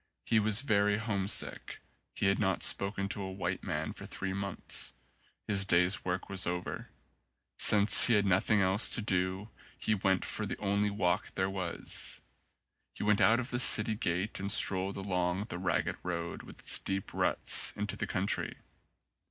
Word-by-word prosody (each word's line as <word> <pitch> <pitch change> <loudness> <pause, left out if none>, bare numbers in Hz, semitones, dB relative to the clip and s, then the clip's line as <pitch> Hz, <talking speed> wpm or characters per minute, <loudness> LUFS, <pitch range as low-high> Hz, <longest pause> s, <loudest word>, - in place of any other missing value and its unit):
He 110 - +2
was 110 +3 +2
very 105 -4 +1
homesick. 105 -3 -2 0.4
He - - -2
had 100 0 +1
not 95 -4 -1
spoken 100 0 +2
to 100 - -4
a 95 -1 -5
white 95 0 -4
man - - -4
for - - -10
three 95 -1 -5
months. 100 0 -3 0.5
His 100 -2 +2
day's 90 0 +1
work 90 0 -4
was 95 -2 -1
over. 90 0 -5 0.7
Since 105 0 +8
he 120 - +3
had 100 -1 +2
noth 95 +2 +1
ing 105 -2 +3
else 95 +3 +4
to - - +1
do 95 +1 -2 0.3
he 110 - -1
went 95 -2 0
for - - -2
the - - -5
only 100 0 -1
walk 95 -2 -2
there 95 0 -1
was. 90 -3 -3 0.8
He - - -6
went 105 -1 +2
out 115 +2 +4
of 125 +1 -4
the 120 - -2
city 110 -3 +4
gate 95 0 -3
and 100 +1 -2
strolled 95 -1 +3
along 90 -1 -2
the 90 - -6
ragged 90 -2 -2
road, 85 -1 -5
with - - -14
its - - +1
deep 95 0 -5
ruts, - - +1
into 105 0 -3
the - - -4
country. 95 +2 -2
100 Hz, 175 wpm, -30 LUFS, 95-105 Hz, 0.8 s, Since